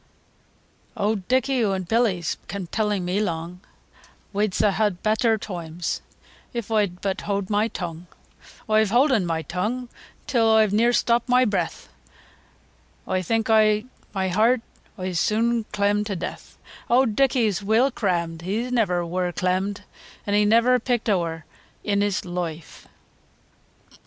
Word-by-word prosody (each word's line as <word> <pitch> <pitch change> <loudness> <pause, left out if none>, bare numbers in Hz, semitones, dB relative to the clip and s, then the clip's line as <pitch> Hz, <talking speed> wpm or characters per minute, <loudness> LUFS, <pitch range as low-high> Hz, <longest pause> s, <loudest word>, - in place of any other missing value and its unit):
II. - - 0
Owd 205 -3 -1
Dicky 260 0 +2
o' 195 -3 +1
Billy's 185 -2 0
kept 185 -2 -6
telling 210 -4 0
me 180 +3 0
lung, 175 -2 -4 0.7
Wee 205 +2 +2
s'd 190 - 0
ha' 215 +1 +2
better 220 +1 +2
toimes 175 -5 -5 0.5
if 235 -2 -4
I'd 205 -5 0
but 195 -1 -2
howd 200 -1 -2
my 210 +2 +2
tung, 175 -4 -6 0.6
Oi've 215 -1 +3
howden 240 -4 +3
my 160 -1 -1
tung, 225 +9 -3 0.4
till 235 -5 +2
oi've 220 -2 +4
near 230 +3 +4
stopped 240 0 +1
my 250 +1 +5
breath, 190 -6 -2 1.2
Oi 185 0 0
think 225 +5 0
i' 215 0 +4 0.3
my 190 -2 -1
heeart 225 +6 +3 0.4
oi'se 185 -2 -2
soon 230 +1 +1
clem 205 0 0
to 205 -2 -3
deeath, 175 - -7 0.3
Owd 240 -3 +3
Dicky's 235 -7 +2
weel 225 +7 +3
crammed, 170 -7 -1
He 215 +8 -2
never 180 -8 +1
wur 180 +1 -1
clemmed, 185 +3 -1 0.4
An' 205 - -1
he 210 0 +4
ne'er 235 +4 +4
picked 240 -1 -1
ower 165 -4 -1 0.4
i' - - -5
his 200 -2 0
loife. 175 -3 -6
205 Hz, 140 wpm, -24 LUFS, 180-225 Hz, 1.2 s, my